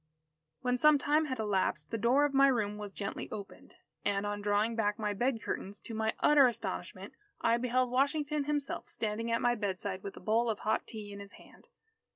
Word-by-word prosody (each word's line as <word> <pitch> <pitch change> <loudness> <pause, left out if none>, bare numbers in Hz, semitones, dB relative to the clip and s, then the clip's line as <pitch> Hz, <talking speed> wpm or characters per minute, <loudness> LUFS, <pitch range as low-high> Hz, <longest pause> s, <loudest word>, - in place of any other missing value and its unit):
When 250 -1 0
some 305 +1 +6
time 300 +3 +2
had 260 -3 -3
elapsed, 190 -8 -1
the 225 - -1
door 255 +6 +4
of 290 - -1
my 275 0 +6
room 210 -5 0
was 205 -1 -6
gently 200 0 -5
opened. 205 -2 -9 0.3
And, 200 0 0
on 205 0 -3
drawing 210 +3 +1
back 210 -2 0
my 210 -2 -1
bed 240 +3 -1
curtains, 200 +2 -4
to 230 - -9
my 220 0 0
utter 290 -3 +7
astonishment, 240 - -5 0.3
I 230 +1 +3
beheld 250 +1 +1
Washington 285 +2 +1
himself 290 -1 -2
standing 225 +1 -3
at 230 - +1
my 240 - +4
bedside 195 -3 -3
with 200 - -7
a - - -7
bowl 230 +2 +1
of 215 - -1
hot 215 - 0
tea 210 -3 -7
in 200 - -8
his 200 0 -10
hand. - - -17
225 Hz, 200 wpm, -32 LUFS, 205-260 Hz, 0.3 s, utter